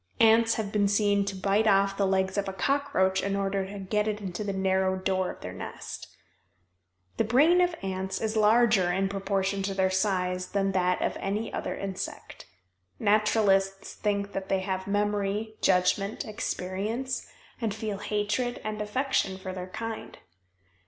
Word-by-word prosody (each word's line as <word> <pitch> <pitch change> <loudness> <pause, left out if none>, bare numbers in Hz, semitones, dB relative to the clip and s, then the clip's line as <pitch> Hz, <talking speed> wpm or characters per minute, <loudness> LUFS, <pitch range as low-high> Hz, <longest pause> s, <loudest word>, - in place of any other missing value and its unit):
Ants 225 0 +5
have 210 -3 -3
been 205 -1 +2
seen 200 0 +2
to 200 0 -3
bite 200 +3 +2
off 195 -1 +4
the 195 -1 +1
legs 190 0 +1
of 200 -1 -1
a - - -5
cockroach 190 -5 +1
in 200 0 -1
order 195 -1 -1
to 205 +1 -7
get 210 +2 -1
it 210 -1 -1
into 190 0 -4
the 200 - -2
narrow 190 0 +1
door 185 -1 0
of - - -9
their - - -6
nest. - - -7 1.1
The - - +3
brain 300 +11 +5
of 355 -1 +2
ants 190 0 -3
is 220 0 -2
larger 215 -3 +4
in 190 +2 0
proportion 195 0 -1
to 195 0 -2
their 190 -1 +2
size 185 -1 0
than 195 -1 +1
that 180 -1 +1
of - - -1
any 210 +3 -3
other - - -3
insect. 195 -1 -6 0.5
Naturalists 205 -2 +2
think 200 -1 -1
that 195 0 -4
they 190 -1 +1
have 190 0 -3
memory, 205 +1 0
judgment, 195 +2 +2
experience, 215 +4 -3 0.3
and 225 -2 0
feel 210 -1 -4
hatred 210 +4 -1
and 215 0 -3
affection 210 -3 0
for 185 0 -6
their 185 0 -6
kind. 225 +3 -6
200 Hz, 165 wpm, -28 LUFS, 190-215 Hz, 1.1 s, Ants